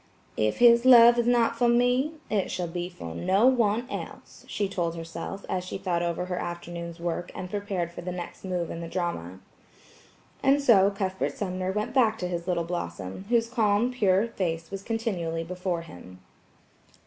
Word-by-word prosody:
"If 110 0 0
his 235 -1 +6
love 240 -2 +8
is 235 - +1
not 235 -1 +3
for 240 +1 +2
me, 245 +5 +2
it 205 -3 0
shall 180 - -2
be 175 +1 -4
for 85 - -8
no 190 - +2
one 240 -2 +3
else," - - -8
she 205 - -1
told 175 -4 -2
herself, 165 +4 -7
as 180 -1 -2
she 185 - -5
thought 175 -3 -1
over 170 +1 -2
her 180 -1 -3
afternoon's 170 0 -6
work 175 +1 -3
and 185 -1 -6
prepared 200 -4 -3
for 170 - -8
the 180 +1 -4
next 175 -1 -7
move 180 -3 -2
in 165 - -6
the 170 - -5
drama. 95 - -4 1.0
And 275 +1 +4
so 210 -8 +5
Cuthbert 190 -2 -3
Sumner 185 -2 -2
went 210 +4 -3
back 225 -5 +3
to 180 - -3
his 175 0 -4
little 175 -2 0
Blossom, 95 - -5
whose 235 -1 +3
calm, 230 0 +2
pure 210 -2 +2
face 165 -5 -3
was 195 -1 -5
continually 195 -8 -2
before 180 0 -3
him. 90 - -12
185 Hz, 180 wpm, -27 LUFS, 170-225 Hz, 1.0 s, love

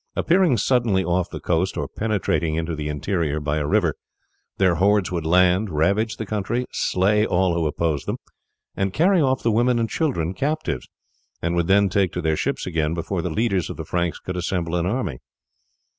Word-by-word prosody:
Appearing 170 -7 +3
suddenly 110 -4 +2
off 90 0 0
the - - -6
coast, 90 +2 0
or - - -2
penetrating 100 -7 -1
into 80 0 -2
the 75 0 -4
interior 75 +1 -1
by 75 0 -1
a 75 -1 -1
river, - - +2 0.6
their 95 -2 +3
hordes 100 +3 +2
would 85 -3 -2
land, 90 +4 +3
ravage 100 +8 +1
the 110 - -4
country, 110 +4 -2
slay 105 +3 +2
all 95 -4 +2
who 85 -2 0
opposed 75 -1 -1
them, - - -2 0.6
and 95 -1 -1
carry 180 - +3
off 130 -2 +1
the 115 - +2
women 120 +3 +2
and 115 -1 -1
children 95 - -1
captives, 145 - -2 0.5
and 85 +1 -1
would 85 -1 +1
then 100 +1 +4
take 95 -1 +1
to 90 - -2
their 80 -1 +2
ships - - -2
again 80 -2 -1
before 85 +2 -2
the 90 - -3
leaders 95 0 0
of - - -6
the - - -6
Franks 85 -1 -1
could 90 - -6
assemble 85 -1 -2
an 85 0 0
army. 100 - -2
90 Hz, 190 wpm, -23 LUFS, 85-110 Hz, 0.6 s, then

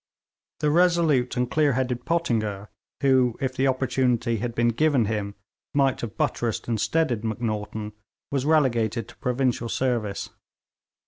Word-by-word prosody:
The 150 -1 +2
resolute 165 -7 +3
and 125 0 +1
clear 150 -3 +3
headed 125 -1 -2
Pottinger, 110 -12 -1 0.3
who, 130 -4 +3
if 130 -1 -2
the 135 +1 +2
opportunity 125 -3 +1
had 115 +2 -4
been 120 0 +3
given 135 0 +2
him, 100 -1 -3 0.4
might 135 -2 +2
have 115 -3 -6
buttressed 120 -6 -1
and 115 -3 -1
steadied 155 -9 0
Macnaghten, 110 -1 -3 0.4
was 135 -2 0
relegated 120 -8 +2
to - - -14
provincial 125 -2 -1
service. 115 -6 -1
125 Hz, 135 wpm, -25 LUFS, 115-135 Hz, 0.4 s, resolute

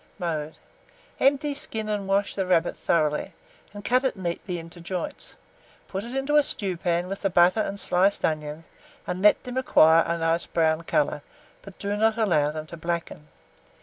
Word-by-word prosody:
Mode. 160 -4 -3 0.6
Empty, 285 +2 +2
skin, 250 -7 -5
and 205 -2 -2
wash 200 +1 +1
the 190 -2 -2
rabbit 175 -2 +2
thoroughly, 150 -3 0 0.4
and 205 -1 -10
cut 255 +2 +3
it 265 - 0
neatly 180 0 -4
into 165 +1 -10
joints. 180 +1 -5 0.5
Put 195 +1 -4
it 240 +3 -7
into 275 +2 +1
a - - +7
stewpan 180 -8 -1
with 195 +1 -5
the 195 - +1
butter 175 +3 +4
and 200 -2 -2
sliced 190 +2 +2
onions, 155 0 -3 0.4
and 180 +1 -4
let 210 +1 +5
them 250 0 -6
acquire 165 -10 +5
a 170 - -1
nice 165 +1 0
brown 160 -1 +1
colour, 150 -1 0 0.4
but 195 -1 -13
do 200 0 -2
not 220 +1 +2
allow 170 -10 +2
them 155 0 -5
to 170 - -10
blacken. 170 -2 -4
180 Hz, 175 wpm, -25 LUFS, 165-210 Hz, 0.6 s, a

